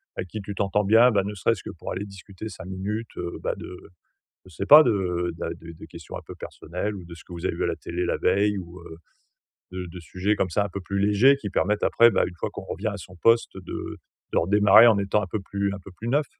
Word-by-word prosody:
avec - - -4
qui 110 - -6
tu 100 +1 -7
t'entends 100 +1 +1
bien. 115 +5 +6
Bah, 100 -3 +2
ne 105 +2 -5
serait-ce 105 +2 0
que - - -7
pour 85 - -7
aller 95 +3 -4
discuter 100 +1 -9
5 95 - -10
minutes, 100 +5 -5
heu, 85 0 -4
bah, - - 0
de 90 - -9 0.7
je - - -15
sais 100 +4 -4
pas, 150 +1 +10
de 90 - 0
de - - -4
de 85 0 -10
de - - -11
questions - - -10
un - - -6
peu - - -9
personnelles, 90 +6 -5
ou 90 -3 -9
de 85 0 -10
ce 85 - -14
que 90 - -13
vous 85 - -6
avez - - -2
vu - - -2
à - - +1
la - - -1
télé 85 +1 -4
la - - 0
veille 105 +1 +2
ou, 90 0 -10
heu, 80 -1 -11 0.7
de 90 0 -5
de 90 - -9
sujets 90 +5 -1
comme 95 - -1
ça, 100 +4 +1
un 100 - -4
peu 100 - -5
plus 100 +2 -3
légers, 105 +7 +5
qui 110 -7 -5
permettent 105 +2 0
après, 115 - +6
bah, - - +2
une 90 - -9
fois - - -2
qu'on - - -8
revient 110 - -4
à 100 -1 -2
son 90 -1 -12
poste, 115 +6 +3
de 95 -2 -7 0.4
de - - +2
redémarrer 105 +5 +6
en 110 -3 +5
étant 100 +1 +1
un 95 - -4
peu 110 - -3
plus 100 0 -2
un 100 - -7
peu 95 +1 -13
plus 115 - -6
neuf. 145 +5 +2
100 Hz, 270 wpm, -25 LUFS, 90-105 Hz, 0.7 s, pas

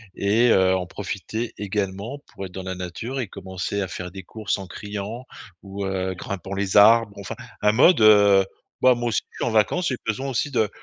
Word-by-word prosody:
et 110 +5 +3
heu, 95 0 +4
en 90 -1 -2
profiter 105 +4 -5
également 100 +5 -3
pour 95 - -6
être 90 - -9
dans 95 +1 -7
la 95 0 -4
nature 90 +9 -5
et 120 - -2
commencer 95 +1 -4
à 95 - -2
faire 90 +1 -6
des 95 0 -9
courses 110 +1 -3
en 95 -2 -8
criant. 105 +5 -6 0.4
Ou, 100 0 -5
heu, 95 -1 -2
grimpant 100 +1 -6
les 100 0 0
arbres 110 0 +6
enfin, 100 - -6 0.3
un 105 - +4
mode: 125 +4 +5
«Heu, 100 -2 +6 0.4
bah, 130 -1 +6
moi 120 0 -2
aussi 105 - 0
je - - -15
suis - - -2
en - - -3
vacances, 110 - +2
j'ai 130 - -1
besoin 130 +5 -2
aussi 135 +3 -1
de, 110 -5 +1
100 Hz, 210 wpm, -23 LUFS, 95-115 Hz, 0.4 s, arbres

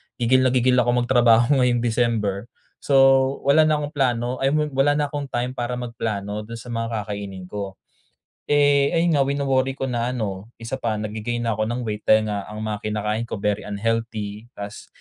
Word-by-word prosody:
gigil 130 +2 +3
na - - +1
gigil 125 +1 +3
akong 120 0 +2
magtrabaho 120 +1 +4
ngayong 120 -1 +2
December 115 -3 0 0.4
so 140 - +1 0.5
wala 155 +3 +6
na 155 -1 +2
akong 145 0 -4
plano 125 -2 0
ay 135 - +3
wala 145 -2 +2
na 150 -1 +1
akong 145 -1 -4
time 125 +2 -2
para 120 0 -3
magplano 105 -4 -4
do'n 115 - -7
sa 125 - -12
mga 115 -2 -2
kakainin 100 -2 -6
ko. 100 0 -6 0.7
Eh, 145 +1 +3
ayun 170 +1 +2
nga 135 - +3
wino-worry 135 -1 0
ko 135 - -3
na 120 0 -1
ano, 100 -3 -4
isa 115 +3 -5
pa, 115 -3 -1
nagge-gain 110 +3 -3
na 115 - 0
ako 110 0 0
ng 120 +2 -3
weight 105 -2 -5
dahil 110 0 +4
nga 100 -1 -4
ang 105 +1 -6
mga 105 -1 -3
kinakain 105 +1 -1
ko - - -4
very 105 0 -1
unhealthy, 110 0 -3
ta's 100 0 -8
115 Hz, 190 wpm, -23 LUFS, 105-130 Hz, 0.7 s, wala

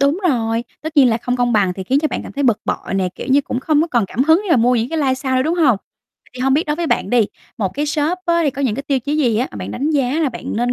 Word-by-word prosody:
đúng 280 +5 +2
rồi. 230 -4 0 0.2
Tất 315 0 -6
nhiên 270 -3 +7
là 225 - +2
không 245 +2 -2
công 245 -1 +1
bằng 200 -4 +2
thì 190 - -5
khiến 265 +8 +2
cho 310 - 0
bạn - - -4
cảm - - -9
thấy 285 - -2
bực 235 -5 +2
bội - - -3
nè. 190 -1 +1
Kiểu - - -7
như, 275 +2 +5
cũng 255 -2 -4
không 300 +2 +2
có - - 0
còn 235 -4 +2
cảm 245 +7 -1
hứng 320 +4 +5
để 395 - -4
mà 330 - +5
mua 245 +2 +3
những 230 0 0
cá 325 - -2
live 275 -4 +1
sau 260 0 -2
nữa, 255 - +2
đúng 320 +5 0
hông? 295 -10 +3 0.6
Thì 255 - -8
hông 265 +1 +2
biết 310 +5 +1
đối 300 0 -1
với 340 0 -2
bạn - - 0
đi, 240 -4 +3 0.3
một 200 -4 0
cái 295 +2 -1
shop 305 +4 0
á, 340 0 +2
thì 290 - +2
có 275 +2 -5
những 245 -6 +1
cái 275 - -4
tiêu 280 -1 0
chí 290 +5 -2
gì 245 -8 +2
á, 245 +4 0
mà - - -10
bạn 95 0 -6
đánh 290 - -2
giá 280 -1 +1
là 310 - +2
bạn 235 - -6
nên 245 +2 +1
260 Hz, 340 wpm, -18 LUFS, 235-300 Hz, 0.6 s, nhiên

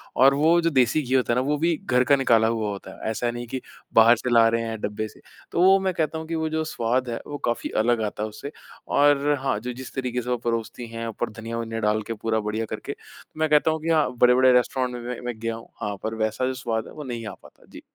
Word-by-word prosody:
और 135 +2 +6
वो 160 +4 +4
जो 165 - +2
देसी 130 +1 +3
घी 130 -1 -3
होता 125 -2 +2
है - - +1
ना, 125 - +2
वो 150 0 +1
भी 165 +2 +1
घर 125 0 +3
का 140 +2 +4
निकाला 115 -4 +3
हुआ 110 -2 -1
होता 100 -1 -7
है, - - -1
ऐसा 120 +2 -1
नहीं 120 0 -6
कि 130 +2 -4 0.3
बाहर 115 +1 +7
से 125 - -4
ला 115 -1 +6
रहे 115 0 0
हैं, 110 -1 -4
डब्बे 105 +1 -3
से। - - -17 0.3
तो 170 - +1
वो 190 +1 +7
मैं 190 -1 -1
कहता 160 -1 -1
हूँ 160 0 -6
कि 165 - -3
वो 160 0 -1
जो 160 0 -1
स्वाद 125 -3 -1
है, 115 - -3
वो 145 - -5
काफ़ी 120 -1 -1
अलग 115 0 +2
आता 105 0 -4
है 110 - -2
उससे 125 +7 -8 0.4
और 145 0 +3
हाँ, 135 -6 0
जो 125 +2 -5
जिस 130 +1 -9
तरीके 125 -2 -2
से 125 - -7
वो 125 - +1
परोसती 115 0 -3
है, 115 0 -5
ऊपर 115 +2 -3
धनिया-वनिया 115 0 -4
डाल 105 0 +1
के 115 - -2
पूरा 110 0 -1
बढ़िया 110 +1 -2
करके। - - -5
तो 155 - -17
मैं 155 -1 +2
कहता 150 +1 +4
हूँ 160 0 -3
कि 165 - -3
हाँ, 155 -5 +3
बड़े-बड़े 125 +1 +5
रेस्टोरेंट 125 0 +1
में, 120 - -6
मैं 125 - -4
मैं 120 -3 -4
गया 115 0 -2
हूँ, 115 - -11
हाँ, 105 -1 -2
पर 110 +1 -3
वैसा 110 +3 -1
जो 130 - -1
स्वाद 115 -3 -3
है - - -12
वो 150 - -8
नहीं 120 -3 -5
आ 100 - -6
पाता। - - -18
जी। - - -11
120 Hz, 275 wpm, -24 LUFS, 115-140 Hz, 0.4 s, बाहर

